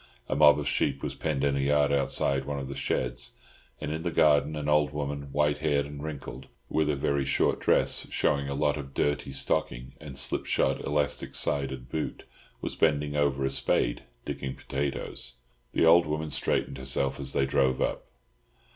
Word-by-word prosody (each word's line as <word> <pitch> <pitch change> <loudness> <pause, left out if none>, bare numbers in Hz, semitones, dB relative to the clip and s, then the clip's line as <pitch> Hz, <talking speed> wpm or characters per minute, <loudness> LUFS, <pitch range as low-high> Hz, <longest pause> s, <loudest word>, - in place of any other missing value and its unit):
A - - -1
mob 75 -1 +7
of 75 - -3
sheep 70 0 0
was - - -2
penned 75 -4 -2
in 70 -1 +2
a - - 0
yard 70 +1 +3
outside 70 -1 +1
one 70 0 -3
of 70 -1 -4
the 70 - -6
sheds; 60 -2 -2 0.5
and - - -4
in 80 +1 -3
the 85 - -1
garden 75 -2 +3
an 75 -1 -4
old 75 0 +3
woman, 70 -1 -4
white 75 +1 +1
haired 75 -2 +1
and 70 0 -8
wrinkled, 70 -3 -7 0.2
with 80 -1 +1
a 75 - +2
very 70 0 0
short 65 - +1
dress - - +2
showing 70 -1 +1
a 70 - -2
lot 75 +1 +1
of 70 -2 -8
dirty 75 -1 0
stocking 65 -2 -1
and 70 -3 -9
slipshod - - 0
elastic 75 0 -1
sided 65 -3 -1
boot, 75 +5 -4 0.4
was - - -3
bending 75 -2 +1
over 70 -2 +1
a 65 - 0
spade, - - +1 0.2
digging 65 -1 -4
potatoes. 70 -3 -3 0.4
The - - +3
old 85 0 +6
woman 75 0 -2
straightened 65 - -1
herself 65 +1 0
as 70 0 -1
they 65 - +2
drove 65 -1 +2
up. - - -1
70 Hz, 180 wpm, -28 LUFS, 70-75 Hz, 0.5 s, mob